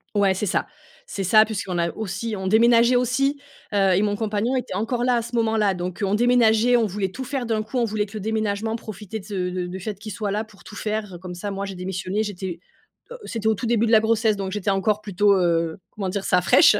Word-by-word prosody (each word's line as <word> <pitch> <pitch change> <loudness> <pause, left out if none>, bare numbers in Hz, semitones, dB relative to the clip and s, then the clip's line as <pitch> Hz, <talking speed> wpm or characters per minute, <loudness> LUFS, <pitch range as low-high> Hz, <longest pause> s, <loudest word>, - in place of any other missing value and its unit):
Ouais, 200 -2 +4
c'est 190 +3 -2
ça. - - 0 0.4
C'est 195 - -4
ça, 215 +4 +6
puisqu'on 200 -4 -3
a 170 0 +1
aussi 215 +2 -4
on 190 -1 -4
déménageait 235 +3 +5
aussi, 275 +4 +1 0.3
heu, 195 -2 +3
et 195 - +3
mon 205 -1 +1
compagnon 220 +3 -1
était 255 - -4
encore 240 +3 -1
là 250 - +3
à 235 - +1
ce 235 +1 -7
moment-là, 220 -3 +2
donc 180 +2 -5
heu, - - +3
on 195 - +1
déménageait, 240 0 +4
on 230 - +2
voulait 195 -1 -2
tout 260 - -6
faire 260 -1 -3
d'un 220 -2 0
coup. 220 +4 -5
On 240 - +2
voulait 210 -1 -1
que 200 - -15
le - - -4
déménagement, 220 +1 -1
profiter 215 -1 -7
de - - -13
s 210 - -12
de 185 -2 -1
de 180 0 -3
du 185 +2 -6
fait 205 +1 -5
qu'il 210 0 -7
soit 210 -2 -3
là 210 +2 -1
pour 215 -2 -18
tout 215 - -11
faire. 210 -3 -3
Comme 180 -1 -7
ça, 180 +4 -5
moi, 195 0 -3
j'ai 195 -1 -6
démissionné 185 +3 -2
j'étais, 190 -4 -5 0.5
heu, - - -7
c'était 225 -2 -3
au 220 - +3
tout 240 - -5
début 230 -1 +2
de - - 0
la 220 - +7
grossesse, 220 -1 +2
donc 195 -1 -3
j'étais 205 0 -2
encore 200 +2 +1
plutôt, 205 0 +2
heu, 165 -2 +1
comment 195 -3 -4
dire 195 +1 -3
ça? 180 - +3
Fraiche! 175 - +6
210 Hz, 255 wpm, -23 LUFS, 190-225 Hz, 0.5 s, la